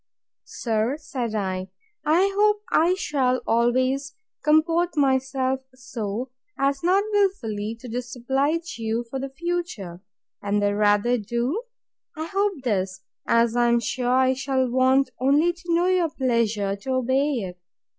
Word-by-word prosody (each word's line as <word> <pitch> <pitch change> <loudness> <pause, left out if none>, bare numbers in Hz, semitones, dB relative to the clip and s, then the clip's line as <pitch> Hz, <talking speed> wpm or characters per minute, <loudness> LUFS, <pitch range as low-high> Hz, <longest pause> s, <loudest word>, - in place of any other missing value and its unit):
Sir, 230 +4 -1
said 250 -7 -4
I, 190 -2 -2 0.3
I 355 +6 +3
hope 420 0 +3
I 345 +3 +4
shall 265 -8 +1
always 255 +4 +1 0.3
comport 330 +2 +2
myself 265 -1 +1 0.2
so, 240 -1 -5 0.3
as 275 0 +1
not 370 +4 +3
wilfully 230 - 0
to 255 - -8
disoblige 265 +6 -2
you 225 +1 -2
for 270 - -3
the 270 +1 -4
future; 270 - -4 0.4
and 205 0 0
the 205 0 +1
rather 210 +4 +3
do 240 - -2 0.6
I 315 - -3
hope 390 -4 -1
this, 190 -5 -1 0.3
as 230 0 +3
I 240 0 +3
am 235 0 +4
sure 245 +2 -2
I 260 +1 +4
shall 265 -1 0
want 260 +2 +3
only 290 +7 +3
to 345 - -18
know 340 +1 +3
your 365 -3 +2
pleasure 230 -7 0
to 260 +6 -4
obey 260 +3 +1
it. 185 -8 -4
260 Hz, 140 wpm, -24 LUFS, 230-305 Hz, 0.6 s, I